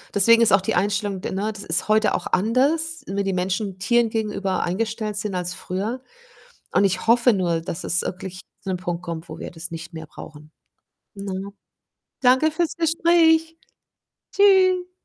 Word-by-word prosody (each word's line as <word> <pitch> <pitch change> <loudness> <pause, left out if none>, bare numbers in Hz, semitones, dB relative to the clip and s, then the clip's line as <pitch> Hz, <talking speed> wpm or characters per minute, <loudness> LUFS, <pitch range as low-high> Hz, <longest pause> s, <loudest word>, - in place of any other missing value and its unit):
deswegen 230 +4 +5
ist 225 -2 +4
auch 195 - +5
die 190 - -1
Einstellung, 200 0 -1
d - - -4
ne 200 +3 -2
das 205 - -8
ist 165 +1 -1
heute 215 0 +3
auch - - -3
anders, 285 - +1
wie 200 +1 -2
die 195 -1 -1
Menschen 185 +1 -2
Tieren 235 +4 +2
gegenüber 210 -4 -2
eingestellt 215 +3 -2
sind 205 -2 -3
als 180 0 -2
früher. 210 +8 -4 0.7
Und - - +3
ich 185 +1 0
hoffe 235 +1 +5
nur, 175 -5 0
dass 165 0 -6
es 175 - +2
wirklich 185 0 -6 0.2
zu 195 - -5
'nem 180 - -2
Punkt 175 -1 -4
kommt, 170 0 -6
wo 155 - -8
wir - - -7
das 170 +2 -7
nicht 165 0 -8
mehr 160 -1 -7
brauchen, 150 0 -12 0.6
ne? 195 0 -6 0.7
Danke 260 +5 +4
fürs 330 0 -1
Gespräch. 325 -1 +3 0.8
Tschü 370 -2 +4
200 Hz, 170 wpm, -22 LUFS, 185-245 Hz, 0.8 s, deswegen